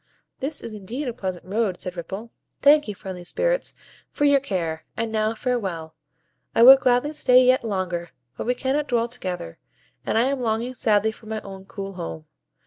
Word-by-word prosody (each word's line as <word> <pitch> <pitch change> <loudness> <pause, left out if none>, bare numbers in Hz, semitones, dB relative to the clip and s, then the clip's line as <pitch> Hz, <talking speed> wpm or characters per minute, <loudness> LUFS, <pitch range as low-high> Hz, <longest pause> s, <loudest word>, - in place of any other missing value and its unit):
"This 285 +3 -3
is 230 - -7
indeed 225 +8 -5
a 245 - -2
pleasant 185 -4 -5
road," 200 -1 -1
said 180 0 -6
Ripple. 195 +7 -6 0.3
"Thank 295 0 +6
you, 210 - -4
friendly 185 -2 -7
Spirits, - - 0 0.3
for 290 - 0
your 285 -1 +6
care; 170 - -3
and 230 0 -2
now 220 0 0
farewell. 190 -11 -2 0.6
I 230 - +6
would 265 +2 +11
gladly 250 +4 +2
stay 255 -3 +5
yet 255 +1 +4
longer, 185 -5 -2 0.3
but - - -5
we 250 - +2
cannot 275 +4 -1
dwell 235 -2 +1
together, 180 - -5 0.4
and - - 0
I 230 - +5
am 275 +1 0
longing 230 +2 -1
sadly 220 -3 +2
for 220 0 -16
my 220 0 -3
own 195 -1 -10
cool 195 0 -7
home. 80 - -6
220 Hz, 185 wpm, -24 LUFS, 190-255 Hz, 0.6 s, would